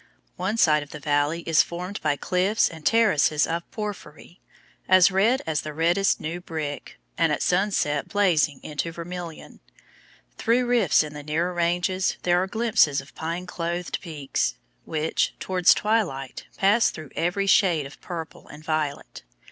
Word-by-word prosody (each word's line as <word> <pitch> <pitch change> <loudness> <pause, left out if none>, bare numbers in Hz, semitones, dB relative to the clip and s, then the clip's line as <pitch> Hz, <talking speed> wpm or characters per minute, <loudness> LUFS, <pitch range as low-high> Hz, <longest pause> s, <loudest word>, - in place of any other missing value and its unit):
One 190 +5 -2
side 150 -7 +4
of 145 - -10
the 150 - -8
valley 145 +3 0
is 160 -2 +4
formed 180 +3 -5
by 150 -2 +1
cliffs 185 +7 +1
and 160 -2 -11
terraces 155 -10 +3
of 170 +1 -4
porphyry 200 -5 -8 0.5
as 185 0 +6
red 215 +7 +2
as 160 -2 -1
the 155 -1 -7
reddest 175 +5 +2
new 170 +3 -5
brick, 155 -4 -6 0.2
and - - +3
at - - 0
sunset 180 -6 +1
blazing 160 -9 +2
into 150 +2 -4
vermilion. 170 0 -8 0.8
Through 240 +2 +2
rifts 240 -10 +3
in 150 -1 -8
the 150 - -7
nearer 160 +5 -1
ranges 175 +2 0
there 175 0 +3
are 190 - -1
glimpses 220 - +2
of 135 +1 -12
pine 170 +3 -4
clothed 175 0 -4
peaks, 150 -6 -2 0.3
which, 160 0 -1
towards 185 -2 +3
twilight, 190 - -1
pass 205 +4 +4
through 155 -4 -9
every 180 +4 0
shade 175 -7 +3
of 135 - -12
purple 165 -3 -8
and 150 +1 -12
violet. 155 -3 -3
170 Hz, 155 wpm, -24 LUFS, 155-190 Hz, 0.8 s, as